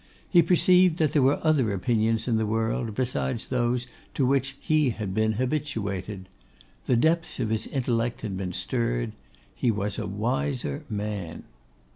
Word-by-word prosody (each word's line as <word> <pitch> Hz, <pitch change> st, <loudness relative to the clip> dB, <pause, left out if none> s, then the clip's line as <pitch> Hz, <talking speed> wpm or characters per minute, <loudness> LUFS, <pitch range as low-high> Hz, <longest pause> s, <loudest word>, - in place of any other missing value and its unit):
He 175 Hz, -, +6 dB
perceived 180 Hz, -1 st, +4 dB
that 155 Hz, -4 st, +2 dB
there 150 Hz, -, +4 dB
were 135 Hz, +2 st, +3 dB
other 140 Hz, -9 st, +3 dB
opinions 110 Hz, +3 st, +1 dB
in 115 Hz, -3 st, +2 dB
the 110 Hz, -, +1 dB
world, 110 Hz, 0 st, -1 dB
besides 125 Hz, -1 st, -2 dB
those 120 Hz, -1 st, 0 dB, 0.3 s
to 135 Hz, -, +2 dB
which 135 Hz, +1 st, +1 dB
he 155 Hz, -3 st, +2 dB
had 105 Hz, -5 st, -4 dB
been 110 Hz, +1 st, +2 dB
habituated. 105 Hz, -7 st, -3 dB, 0.6 s
The 125 Hz, -, +3 dB
depths 160 Hz, +7 st, +1 dB
of 110 Hz, -, -1 dB
his 110 Hz, -1 st, -1 dB
intellect 120 Hz, -2 st, -1 dB
had 100 Hz, -4 st, -4 dB
been 95 Hz, -1 st, -4 dB
stirred. 90 Hz, -, -1 dB, 0.4 s
He 125 Hz, -, 0 dB
was 105 Hz, -1 st, -1 dB
a -, -, -3 dB
wiser 130 Hz, +7 st, -2 dB
man. 105 Hz, -5 st, -4 dB
120 Hz, 155 wpm, -26 LUFS, 105-135 Hz, 0.6 s, He